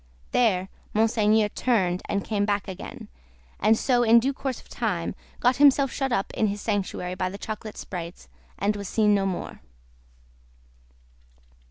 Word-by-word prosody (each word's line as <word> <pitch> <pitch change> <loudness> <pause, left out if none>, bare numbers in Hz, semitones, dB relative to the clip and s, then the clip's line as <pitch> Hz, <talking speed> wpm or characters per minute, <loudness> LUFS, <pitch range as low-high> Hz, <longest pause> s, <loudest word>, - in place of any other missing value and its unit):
There, 190 -6 +2 0.3
Monseigneur 215 -1 +3
turned, 190 -7 +1
and 200 - 0
came 205 -2 0
back 205 -1 0
again, 190 -2 -8 0.5
and 220 - +4
so 245 0 +2
in 235 0 +6
due 265 +4 0
course 265 -2 -4
of - - -18
time 190 -8 -2 0.3
got 250 +1 +3
himself 275 -2 +5
shut 270 -2 -2
up 195 -5 -1
in 220 - +1
his 205 0 -3
sanctuary 195 -4 -2
by 185 0 -2
the 195 - -7
chocolate 215 +1 -6
sprites, 175 -2 -7 0.3
and 205 +1 0
was 200 -1 -5
seen 210 -2 +3
no 195 -1 +2
more. 185 - -5
210 Hz, 155 wpm, -25 LUFS, 195-235 Hz, 0.5 s, in